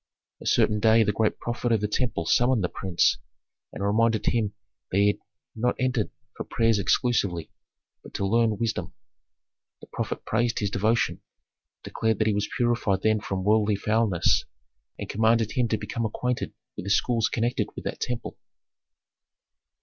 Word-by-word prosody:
A - - -6
certain 105 - +3
day 110 +1 +5
the 105 - +1
great 110 +1 0
prophet 120 0 -2
of 115 - +3
the 105 - -1
temple 110 -6 -1
summoned 120 +2 +3
the 90 - 0
prince, 90 -9 +1 0.5
and 100 - -4
reminded 110 +1 +2
him 110 -3 0 0.3
that 95 - -1
he 100 - +5
had 105 - -1 0.4
not 120 +2 0
entered 125 -4 0 0.3
for - - -5
prayers 115 -2 +1
exclusively, 100 - 0 0.5
but - - -13
to 100 - -1
learn 110 +1 +2
wisdom. 115 +1 -3 0.8
The - - -12
prophet - - -4
praised 120 +2 0
his 100 -2 -1
devotion, 110 +4 +1 0.6
declared 110 0 -1
that 110 - +1
he 110 - +2
was 105 +1 -1
purified 115 -5 +1
then 110 0 +3
from 95 -2 -4
worldly 105 0 +3
foulness, 105 -3 +1 0.5
and - - -6
commanded 110 +1 +2
him 125 -2 +1
to 110 - 0
become 115 +1 -3
acquainted 125 +3 -3 0.2
with 95 - -6
the - - -2
schools 115 +2 +2
connected 120 +1 0
with - - -7
that - - -4
temple. 125 -1 -4
110 Hz, 165 wpm, -26 LUFS, 100-115 Hz, 0.8 s, day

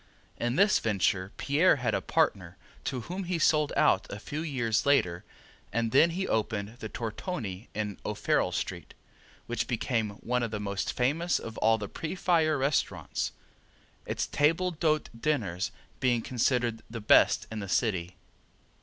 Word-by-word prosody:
In 120 +1 -1
this 200 +4 +5
venture 100 -3 0
Pierre 155 +6 +4
had 125 -4 -1
a - - 0
partner, 90 -1 0 0.3
to 130 -3 -2
whom 185 +9 -5
he 175 0 -1
sold 155 -2 +3
out - - +3
a 105 - -5
few 145 +8 -5
years 120 -8 0
later 90 -12 +2 0.5
and 115 +1 0
then 150 +5 +6
he 185 +3 -2
opened 110 0 -1
the 110 - -6
Tortoni 115 - -5
in 105 -2 -3
O'Farrell - - 0
street, - - -4 0.5
which 120 - -2
became 115 -2 0 0.2
one 125 +1 +1
of 120 - -1
the 105 -1 -4
most 100 -1 -2
famous 155 +8 +1
of 115 - -7 0.2
the 105 - -4
pre 160 - -5
fire 165 -4 +2
restaurants, 135 +2 -1 0.8
its - - -1
table 165 +5 +2
d'hote 155 -2 0
dinners 110 - 0 0.3
being 120 -3 +2
considered 120 -2 0
the 115 0 -5
best 105 - +5
in 110 - -4
the 100 -2 -6
city. 95 -6 0
120 Hz, 155 wpm, -29 LUFS, 105-155 Hz, 0.8 s, then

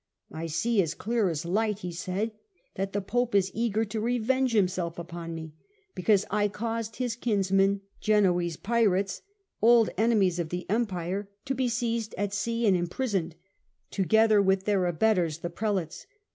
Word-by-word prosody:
" - - -61
I 160 +2 -5
see 210 +7 +1
as 165 -3 -2
clear 225 -3 0
as 160 -1 -3
the 170 - -5
light," 215 0 +1
he 180 - -4
said, 185 +6 -3 0.2
" - - -42
that 195 +1 -2
the 205 - -1
Pope 240 +3 -1
is 190 -1 +3
eager 225 -1 0
to 215 +1 -4
revenge 245 +3 +1
himself 185 -5 0
upon 170 -1 -6
me, 160 -1 -7 0.4
because 200 +2 +2
I 205 0 +2
caused 225 +1 -4
his 245 -3 -2
kinsmen, 195 -3 +1 0.2
Genoese 180 -6 +2
pirates, 200 -4 +1 0.4
old 230 0 +5
enemies 205 -6 +3
of 165 -2 -2
the 180 +1 -4
Empire, 200 -3 -1 0.2
to 270 - -1
be 255 -1 0
seized 230 -2 -2
at 205 0 -2
sea 230 +3 -1
and 200 -3 +5
imprisoned, 175 -1 -2 0.6
together 215 +2 +4
with 190 0 +2
their 195 -4 +2
abettors 175 -3 +1
the 170 +1 -5
Prelates. 190 - -3
200 Hz, 170 wpm, -28 LUFS, 180-225 Hz, 0.6 s, old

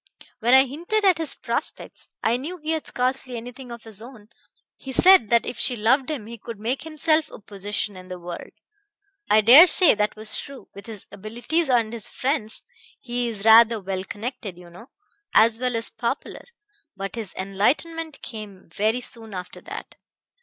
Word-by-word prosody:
When 240 +3 +4
I 265 +1 +7
hinted 345 - -2
at 365 -4 +4
his 320 - +3
prospects - - -5 0.2
I 225 - +2
knew 305 +9 -5
he 315 -1 -4
had 320 -1 -2
scarcely 255 0 -2
anything 245 +2 -9
of 235 -1 -9
his 220 -2 -7
own 230 -3 -13 0.5
he 270 - -9
said 355 - +6
that 235 -1 +3
if 245 - -6
she 250 - +2
loved 250 +5 +2
him 280 -9 -4
he 230 +1 -10
could 225 -1 -9
make 240 +5 -2
himself 310 0 +1
a - - -11
position 205 0 -4
in 185 0 -11
the 185 0 -7
world. 175 0 -8 0.8
I 215 +1 +5
dare 260 - +9
say 355 0 +6
that 210 0 -1
was 215 0 -1
true, 275 -1 -10
with 200 +1 -12
his 215 -4 -6
abilities 240 - -2
and 235 -3 +2
his 230 -3 -2
friends; 255 -5 -3 0.4
he 245 -1 -2
is 215 -3 -4
rather 225 0 +7
well 190 -1 -4
connected, 210 -1 -6
you 175 -1 -14
know, 225 +9 -14 0.5
as 225 +1 +5
well 250 -1 -1
as 230 0 -2
popular. 245 +4 -4 0.5
But 195 0 -5
his 225 -5 -6
enlightenment 285 - -1
came 210 -7 -9
very 220 +4 0
soon 225 -4 -8
after 180 0 -8
that. - - -9
235 Hz, 180 wpm, -23 LUFS, 210-265 Hz, 0.8 s, dare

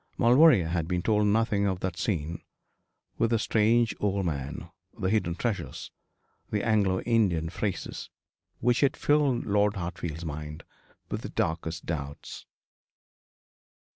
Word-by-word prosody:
Maulevrier 120 - +6
had 85 -2 -1
been 90 -1 -1
told 105 -1 +2
nothing 105 -1 +2
of 95 -2 -1
that 90 -2 -2
scene 85 -3 -2 0.8
with 115 - +3
the 115 - +2
strange 115 +1 +2
old 100 -2 0
man 70 -4 -4 0.3
the 95 - -1
hidden 90 -6 +1
treasures 95 - -4 0.6
the 105 -1 -1
Anglo 100 -4 +2
Indian 95 -9 +1
phrases 100 0 -4 0.5
which 120 +1 +2
had 140 -1 +2
filled 145 -4 +2
Lord 105 0 +2
Hartfield's 85 -3 -5
mind 75 0 -6 0.5
with - - -2
the - - -6
darkest 80 0 -2
doubts. 70 -4 -6
95 Hz, 130 wpm, -28 LUFS, 85-110 Hz, 0.8 s, Maulevrier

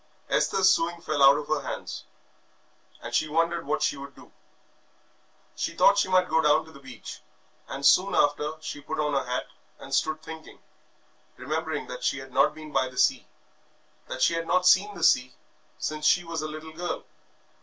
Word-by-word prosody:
Esther's 190 -1 +2
sewing 170 0 -1
fell 155 -4 -2
out 140 +1 +7
of 150 - -5
her 155 -2 0
hands, - - -6 1.0
and 120 +1 -7
she 155 - +2
wondered 165 +1 0
what 150 - 0
she - - +1
should 140 -1 -10
do. - - -16 1.2
She - - -3
thought - - +6
that 200 0 +2
she 200 - +2
might 185 -1 +3
go 160 -1 +2
down 155 +1 +3
to 160 - -15
the 140 - -14
beach, 130 -5 -10 0.5
and 140 0 -5
soon 190 +7 +5
after 150 +1 +1
she 145 -1 -6
put 145 - -5
on 150 -1 0
her 135 - +1
hat 125 - -1 0.3
and - - -10
stood 155 0 0
thinking, 160 0 -10 0.8
remembering 155 +3 -3
that 125 0 -8
she 135 - 0
had 130 -1 -10
not - - +3
been 155 -1 -10
by 130 -2 +1
the 125 - -15
sea, - - +2 0.8
that - - -3
she - - +4
had 165 0 -3
not 180 0 +2
seen 200 +3 +4
the - - -6
sea 125 0 +3 0.4
since 155 0 -2
she 175 - +4
was 165 -2 -4
a 155 - -3
little 155 +1 -9
girl. 175 +2 -4
155 Hz, 195 wpm, -26 LUFS, 140-165 Hz, 1.2 s, out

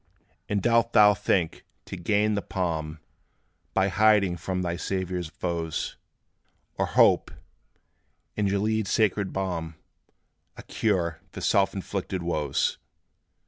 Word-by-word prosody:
And 100 -2 0
dost 115 0 +3
thou 105 -1 +7
think 95 -4 0 0.2
to - - -7
gain 105 +4 +1
the 100 - 0
palm 80 -5 -3 0.8
By 95 +1 +3
hiding 105 -2 +3
from 90 +2 -3
thy 85 -1 -2
Saviour's 90 -1 -3
foes; 85 -1 -3 0.8
Or - - 0
hope - - +4 1.1
in 105 -1 0
Gilead's 105 +1 0
sacred 100 -3 +1
balm 85 -4 -3 0.8
A - - -9
cure 85 -7 -1
for - - -9
self 100 -2 +2
inflicted 95 -1 -4
woes? 75 -5 -1
95 Hz, 115 wpm, -26 LUFS, 85-105 Hz, 1.1 s, thou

